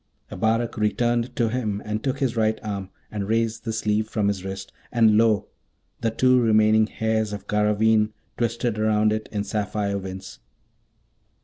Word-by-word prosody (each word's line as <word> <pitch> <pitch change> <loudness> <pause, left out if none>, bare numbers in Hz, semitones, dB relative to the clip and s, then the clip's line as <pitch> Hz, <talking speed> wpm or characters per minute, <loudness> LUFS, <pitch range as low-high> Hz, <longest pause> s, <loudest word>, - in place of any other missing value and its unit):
Abarak 115 +4 0
returned 120 +3 0
to 120 -6 +1
him, 110 -4 -2
and 105 +1 -3
took 135 -1 -1
his 135 -4 -1
right 110 -1 +1
arm, 100 -3 -4 0.2
and 100 -2 -3
raised 115 0 0
the 115 - -1
sleeve 110 0 0
from 105 -2 +1
his 95 -2 -3
wrist, 95 0 -7 0.2
and 110 -3 +4
lo, 110 -2 +3 0.5
the 115 - 0
two 125 +2 +3
remaining 110 -1 +4
hairs 110 -1 -1
of 100 -2 -6
Garraveen 105 +1 +2 0.2
twisted 115 -1 -1
round 110 0 +3
it 110 0 -4
in 105 -2 -2
sapphire 100 -1 -2
winds. 95 0 -8
110 Hz, 155 wpm, -24 LUFS, 105-115 Hz, 0.5 s, and